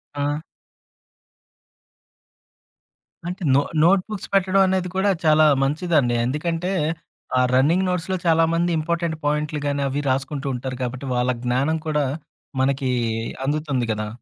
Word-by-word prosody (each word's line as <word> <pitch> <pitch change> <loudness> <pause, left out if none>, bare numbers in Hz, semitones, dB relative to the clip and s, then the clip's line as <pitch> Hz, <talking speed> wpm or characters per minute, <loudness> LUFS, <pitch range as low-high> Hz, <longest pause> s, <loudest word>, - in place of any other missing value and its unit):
ఆ! 145 +1 -1 2.9
అంటే 180 +2 -5
నొ - - +6 0.2
నోట్‌బుక్స్ 195 +3 +1
పెట్టడం 195 0 +3
అనేది 185 -1 0
కూడా 190 +2 +2 0.2
చాలా 155 0 +5 0.2
మంచిదండి. 145 -3 +1
ఎందుకంటే 165 +7 -2 0.7
ఆహ్, 125 0 +4
రన్నింగ్ 160 +9 +3
నోట్స్‌లో 180 +1 -1
చాలామంది 165 +1 +3
ఇంపార్టెంట్ 170 +1 -1
పాయింట్లు 150 +1 0
గాని 140 0 -1
అవి 140 +2 -2
రాసుకుంటూ 135 +2 -2
ఉంటారు 130 +1 -5
కాబట్టి, 125 +2 -4
వాళ్ళ 125 +1 +1
జ్ఞానం 135 +6 +1
కూడా 150 -2 +1 0.6
మనకి 135 -1 +1 0.5
అందుతుంది 145 -4 -1
కదా! 105 0 -4
150 Hz, 115 wpm, -22 LUFS, 135-170 Hz, 2.9 s, నొ